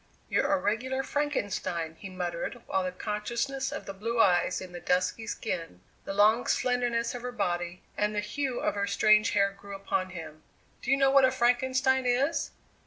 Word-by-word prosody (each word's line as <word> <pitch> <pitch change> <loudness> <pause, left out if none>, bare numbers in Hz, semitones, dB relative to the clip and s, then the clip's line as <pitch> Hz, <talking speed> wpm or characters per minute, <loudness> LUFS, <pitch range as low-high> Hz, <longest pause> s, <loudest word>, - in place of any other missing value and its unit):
"You're 290 - +2
a 290 - +4
regular 260 +3 -1
Frankenstein," 200 - -2
he 195 - -7
muttered, 180 +5 -4
while 190 - 0
the 185 - -2
consciousness 235 +8 -2
of - - -5
the 195 - -6
blue 230 +4 -3
eyes 180 -4 +3
in 185 -1 -8
the 175 - -7
dusky 185 +6 0
skin, 165 - -4 0.2
the - - -4
long 215 +4 +4
slenderness 245 -2 +1
of 245 - -6
her 250 +1 -4
body, 175 -5 -2
and 210 0 0
the - - +1
hue 250 +5 -2
of - - +1
her 200 0 -1
strange 215 +2 +4
hair 200 -2 +3
grew 200 0 -10
upon 190 -1 -2
him. 160 -3 -9 0.4
"Do - - -5
you 270 - +5
know 270 -1 +4
what 275 0 +6
a 260 - +6
Frankenstein 260 +1 +2
is?" 270 +6 +1
215 Hz, 185 wpm, -29 LUFS, 185-255 Hz, 0.4 s, what